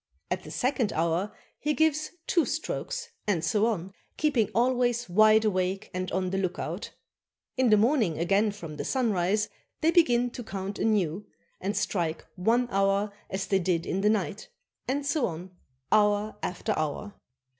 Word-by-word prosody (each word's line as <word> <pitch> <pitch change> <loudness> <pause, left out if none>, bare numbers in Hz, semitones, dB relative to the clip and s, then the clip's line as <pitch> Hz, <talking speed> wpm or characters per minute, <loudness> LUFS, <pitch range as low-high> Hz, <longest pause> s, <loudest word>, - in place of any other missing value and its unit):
At 180 +1 0
the - - -10
second 250 -4 0
hour, 170 +5 0 0.3
he 300 0 0
gives 310 -1 +2 0.2
two 340 - +3
strokes, 475 - -3 0.2
and 170 -6 +1
so 210 +7 +2
on, 190 -4 -2 0.2
keeping 275 -8 +2
always 245 0 +2
wide 215 +4 +5
awake 190 0 -1
and 185 0 -3
on 185 0 -1
the 195 - 0
lookout. 185 -2 -3 0.7
In 260 -2 +3
the 215 - +6
morning 220 - +2
again 200 +6 +2
from 170 -7 -7
the - - -3
sunrise, 210 -4 +1 0.3
they 320 - +4
begin 245 -8 +4
to 245 - -7
count 195 -1 -5
anew, 205 -3 +1 0.3
and 200 +3 -2
strike 170 -4 -1
one 230 +7 +2
hour 195 +1 +1 0.2
as 190 0 -2
they 195 - +2
did 175 -2 0
in 190 - -1
the 210 - +4
night, 210 - -1 0.4
and 280 +2 -1
so 285 -2 +1
on 175 +2 -7 0.4
hour 210 0 +3
after 195 +5 -2
hour. 155 +7 -3
210 Hz, 160 wpm, -28 LUFS, 185-240 Hz, 0.7 s, the